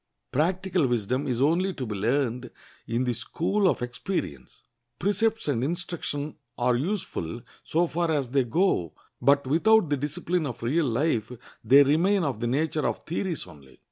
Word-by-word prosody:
Practical 180 Hz, +1 st, +1 dB
wisdom 120 Hz, +2 st, -1 dB
is 125 Hz, 0 st, +1 dB
only 180 Hz, +6 st, +2 dB
to 130 Hz, -, -4 dB
be 110 Hz, -, -4 dB
learned 120 Hz, +3 st, 0 dB, 0.4 s
in 115 Hz, +2 st, 0 dB
the 125 Hz, -1 st, 0 dB
school 175 Hz, -, 0 dB
of 130 Hz, -, -1 dB
experience. 120 Hz, -, -5 dB, 0.3 s
Precepts 215 Hz, +3 st, 0 dB
and 125 Hz, -5 st, 0 dB
instruction 155 Hz, -2 st, -3 dB, 0.2 s
are 125 Hz, 0 st, +2 dB
useful 130 Hz, -, -3 dB, 0.2 s
so 170 Hz, +2 st, +1 dB
far 170 Hz, 0 st, -1 dB
as 140 Hz, -6 st, 0 dB
they 135 Hz, -1 st, +3 dB
go; 120 Hz, -, +1 dB, 0.3 s
but 140 Hz, 0 st, +4 dB
without 170 Hz, +5 st, +3 dB
the 145 Hz, -, +2 dB
discipline 150 Hz, +4 st, -2 dB
of 120 Hz, -, -7 dB
real 145 Hz, +6 st, +1 dB
life 120 Hz, -2 st, 0 dB, 0.3 s
they 140 Hz, +2 st, +7 dB
remain 175 Hz, +7 st, +3 dB
of 135 Hz, -8 st, -2 dB
the 120 Hz, -, -1 dB
nature 155 Hz, +4 st, 0 dB
of -, -, -4 dB
theories 175 Hz, 0 st, -3 dB
only. 65 Hz, -3 st, -16 dB
145 Hz, 160 wpm, -26 LUFS, 120-175 Hz, 0.4 s, they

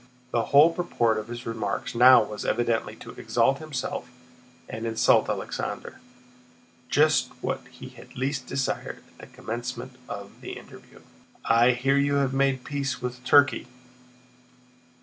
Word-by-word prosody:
The 115 Hz, -1 st, +1 dB
whole 150 Hz, +4 st, +6 dB
purport 120 Hz, -11 st, 0 dB
of 110 Hz, -, -7 dB
his 120 Hz, +1 st, -7 dB
remarks 110 Hz, -3 st, -3 dB
now 125 Hz, 0 st, +7 dB
was 105 Hz, 0 st, -6 dB
evidently 115 Hz, -1 st, 0 dB
to -, -, -11 dB
exalt 135 Hz, +1 st, +1 dB
himself 135 Hz, -4 st, -5 dB, 0.6 s
and 110 Hz, +1 st, -5 dB
insult 115 Hz, 0 st, +3 dB
Alexander—just 125 Hz, 0 st, -3 dB
what -, -, -2 dB
he -, -, -11 dB
had -, -, -15 dB
least 130 Hz, 0 st, -2 dB
desired 135 Hz, -1 st, -3 dB
at -, -, -26 dB
the -, -, -11 dB
commencement 120 Hz, +2 st, -6 dB
of 100 Hz, 0 st, -8 dB
the -, -, -7 dB
interview. -, -, -13 dB, 0.4 s
"I 120 Hz, +2 st, +5 dB
hear 135 Hz, +3 st, +1 dB
you 140 Hz, 0 st, +2 dB
have 135 Hz, -2 st, +1 dB
made 135 Hz, -1 st, +1 dB
peace 140 Hz, -2 st, -3 dB
with 125 Hz, 0 st, -6 dB
Turkey?" 145 Hz, -2 st, +4 dB
125 Hz, 135 wpm, -26 LUFS, 115-135 Hz, 0.6 s, now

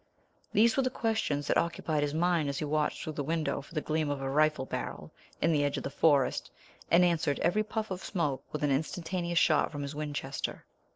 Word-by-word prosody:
These 225 Hz, +1 st, +4 dB
were -, -, +5 dB
the 255 Hz, -, +1 dB
questions 220 Hz, -, -1 dB
that -, -, +3 dB
occupied 160 Hz, -2 st, -1 dB
his 145 Hz, 0 st, -1 dB
mind 170 Hz, -3 st, +2 dB
as 140 Hz, -, -3 dB
he 155 Hz, -, -2 dB
watched 150 Hz, 0 st, 0 dB
through 155 Hz, -, -4 dB
the 145 Hz, -, -3 dB
window 160 Hz, -1 st, -1 dB
for 150 Hz, -, -15 dB
the 155 Hz, -, +1 dB
gleam 155 Hz, -1 st, -1 dB
of 145 Hz, -1 st, -2 dB
a 135 Hz, 0 st, -3 dB
rifle 150 Hz, -1 st, +2 dB
barrel -, -, -5 dB, 0.3 s
in 165 Hz, -, +2 dB
the 150 Hz, -2 st, +2 dB
edge 145 Hz, -1 st, 0 dB
of -, -, -4 dB
the -, -, -4 dB
forest 145 Hz, -2 st, +2 dB, 0.4 s
and 175 Hz, +1 st, +6 dB
answered 160 Hz, -5 st, +1 dB
every 175 Hz, +6 st, +2 dB
puff 215 Hz, -1 st, -4 dB
of 185 Hz, 0 st, -4 dB
smoke 150 Hz, -8 st, -1 dB
with 150 Hz, -, -3 dB
an 145 Hz, -, +2 dB
instantaneous 170 Hz, +4 st, -1 dB
shot 155 Hz, -2 st, +4 dB
from 145 Hz, -2 st, -4 dB
his 140 Hz, +1 st, -5 dB
Winchester. 145 Hz, -2 st, -4 dB
155 Hz, 220 wpm, -30 LUFS, 145-170 Hz, 0.4 s, and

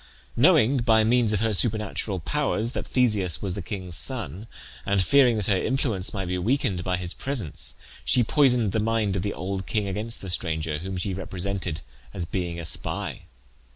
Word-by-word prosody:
Knowing, 140 Hz, -2 st, +5 dB
by 115 Hz, -3 st, +4 dB
means 115 Hz, 0 st, +3 dB
of 105 Hz, -1 st, +1 dB
her 110 Hz, -1 st, +1 dB
supernatural 105 Hz, -2 st, 0 dB
powers, 120 Hz, -, -1 dB
that -, -, -5 dB
Theseus 100 Hz, -, +1 dB
was 95 Hz, -3 st, -3 dB
the 100 Hz, -, -4 dB
king's 90 Hz, -1 st, -6 dB
son, 110 Hz, -, -2 dB, 0.4 s
and 100 Hz, +5 st, +1 dB
fearing 125 Hz, +4 st, +5 dB
that 105 Hz, -, +1 dB
her 100 Hz, -, +3 dB
influence 110 Hz, -3 st, 0 dB
might 95 Hz, -3 st, -3 dB
be 90 Hz, +1 st, -2 dB
weakened 100 Hz, -4 st, 0 dB
by 90 Hz, 0 st, 0 dB
his 90 Hz, 0 st, -5 dB
presence, 90 Hz, -, -1 dB, 0.3 s
she 125 Hz, -, +3 dB
poisoned 125 Hz, -5 st, +3 dB
the 110 Hz, -, 0 dB
mind 110 Hz, -2 st, 0 dB
of 95 Hz, -, 0 dB
the 100 Hz, -, -3 dB
old 95 Hz, +1 st, -4 dB
king 105 Hz, -3 st, 0 dB
against 105 Hz, +4 st, -2 dB
the 95 Hz, -, -5 dB
stranger, 80 Hz, -3 st, -1 dB
whom 95 Hz, +2 st, -5 dB
she 95 Hz, +2 st, -2 dB
represented 95 Hz, -2 st, -3 dB, 0.3 s
as 85 Hz, -, -1 dB
being 85 Hz, 0 st, -3 dB
a 85 Hz, -, -5 dB
spy. 75 Hz, -, -2 dB
100 Hz, 185 wpm, -25 LUFS, 90-115 Hz, 0.4 s, Knowing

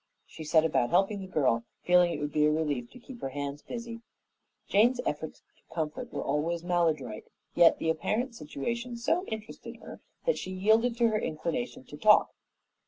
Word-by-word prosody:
She 160 Hz, -, -10 dB
set 155 Hz, +1 st, +4 dB
about 135 Hz, -6 st, +1 dB
helping 195 Hz, +3 st, +2 dB
the 190 Hz, -, -7 dB
girl, 130 Hz, -9 st, +1 dB, 0.2 s
feeling 180 Hz, -1 st, +5 dB
it 150 Hz, -, -3 dB
would 145 Hz, 0 st, -3 dB
be 150 Hz, 0 st, +4 dB
a -, -, +3 dB
relief 150 Hz, -6 st, -1 dB
to -, -, -14 dB
keep 240 Hz, 0 st, -12 dB
her -, -, -3 dB
hands 140 Hz, +1 st, -5 dB
busy. 235 Hz, -1 st, -7 dB, 0.7 s
Jane's 240 Hz, +5 st, +4 dB
efforts 150 Hz, +1 st, -4 dB
to -, -, -20 dB
comfort 165 Hz, +10 st, -3 dB
were -, -, -3 dB
always 160 Hz, +4 st, -1 dB
maladroit, 170 Hz, -10 st, 0 dB, 0.3 s
yet 170 Hz, -, +6 dB
the 160 Hz, -, +1 dB
apparent 230 Hz, -, -1 dB
situation 235 Hz, -, -4 dB
so 330 Hz, +10 st, 0 dB
interested 220 Hz, -1 st, -7 dB
her -, -, -11 dB, 0.2 s
that -, -, +1 dB
she -, -, -6 dB
yielded 220 Hz, +6 st, +2 dB
to 235 Hz, -1 st, +4 dB
her 215 Hz, -1 st, 0 dB
inclination 155 Hz, -7 st, -3 dB
to 145 Hz, -, -11 dB
talk. 210 Hz, +7 st, +5 dB
175 Hz, 180 wpm, -29 LUFS, 150-230 Hz, 0.7 s, yet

